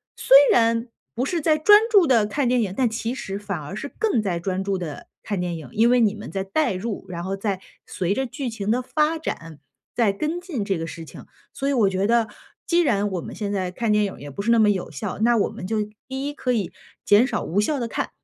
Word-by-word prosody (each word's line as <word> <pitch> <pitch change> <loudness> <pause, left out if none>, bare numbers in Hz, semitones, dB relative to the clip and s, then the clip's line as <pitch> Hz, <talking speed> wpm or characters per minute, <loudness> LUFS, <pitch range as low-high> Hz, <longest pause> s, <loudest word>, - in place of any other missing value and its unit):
虽 265 - +4 0.2
然 230 +1 +2 0.3
不 245 +2 -1
是 340 +4 -1
在 305 +1 +3
专 415 +7 +7
注 400 -7 +5
地 235 -5 +4
看 255 +6 -1
电 245 -1 +2
影， 195 -4 -2
但 250 0 +2
其 225 +1 -3
实 195 -6 -5
反 200 -4 -4
而 150 +7 -7
是 280 +7 -6
更 425 - +2
在 185 -5 -2
专 190 +2 -2
注 195 0 -1
地 165 -5 -7
看 205 -3 -3
电 175 -1 -2
影。 150 -6 -10
因 230 +2 +4
为 250 0 +4
你 215 -2 +3
们 210 - -8
在 195 -1 -2
代 240 +4 0
入， 195 +1 -4
然 170 -1 -5
后 190 +2 -2
在 195 -1 -3 0.2
随 185 +1 -1
着 265 +5 -1
剧 255 +1 -4
情 215 -2 -2
的 250 +2 +1
发 305 +5 0
展， 165 - -6 0.3
在 225 -4 +2
跟 310 - -2
进 345 - -4
这 195 -3 0
个 165 - -4
事 165 - -8
情。 - - -12 0.3
所 275 - -3
以 - - +2
我 225 -7 +3
觉 190 +1 0
得 230 -1 +3 0.4
既 345 0 +3
然 205 -9 +1
我 180 - -2
们 - - -8
现 205 -2 -3
在 185 -2 -2
看 225 +4 -1
电 210 - +3
影 195 - -6
也 145 - -8
不 140 - -5
是 225 +3 +1
那 230 - +5
么 215 -1 +5
有 190 -5 -1
效， 150 +5 -5
那 235 +1 +4
我 205 - +1
们 - - -8
就 220 +4 -1 0.3
一 270 +2 -3
可 255 -3 -2
以 210 -8 -1 0.3
减 205 +4 +6
少 - - -2
无 200 +6 +1
效 285 +6 0
地 235 - -2
看， - - -3
215 Hz, 275 characters per minute, -23 LUFS, 195-255 Hz, 0.4 s, 专